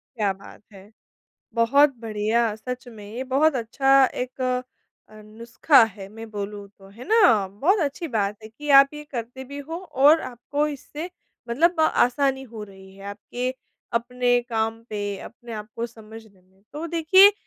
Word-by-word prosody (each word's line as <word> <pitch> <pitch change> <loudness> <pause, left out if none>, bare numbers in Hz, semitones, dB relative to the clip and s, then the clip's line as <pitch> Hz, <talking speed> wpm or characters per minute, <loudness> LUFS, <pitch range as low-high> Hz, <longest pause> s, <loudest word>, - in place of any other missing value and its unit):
क्या 210 -4 +1
बात 195 +2 -15
है! 195 +1 -14 0.7
बहुत 275 +5 +4
बढ़िया, 220 0 0
सच 250 +3 -7
में 215 -3 -11
ये 255 +2 -4
बहुत 275 +4 +2
अच्छा 270 +3 +4
एक 255 +1 -5
अ, 255 0 0 0.6
नुस्ख़ा 230 +6 +3
है 200 -3 -9
मैं 225 +2 -10
बोलूँ 205 0 -6
तो, 195 0 -16
है 225 +6 -12
ना? 250 - +5
बहुत 290 - +1
अच्छी 300 +3 -3
बात 205 -4 -1
है 220 - -9
कि 295 +7 -10
आप 275 - +3
ये 300 0 -8
करते 245 +2 -6
भी 280 +2 -8
हो 310 +4 -6
और 305 -3 +4
आपको 255 +4 -2
इससे 300 +4 -7 0.4
मतलब 325 +7 +2
आसानी 270 -2 +2
हो 225 -4 -9
रही 190 -1 -15
है, 195 - -12
आपके 240 +5 -4 0.4
अपने 245 +1 +1
काम 225 0 -1
पे, 205 -2 -3
अपने 235 +1 -11
आपको 215 +2 -5
समझने 220 -3 -14
में। 190 +1 -31
तो 305 +3 -5
देखिए, 345 +5 +6
235 Hz, 160 wpm, -24 LUFS, 215-280 Hz, 0.7 s, देखिए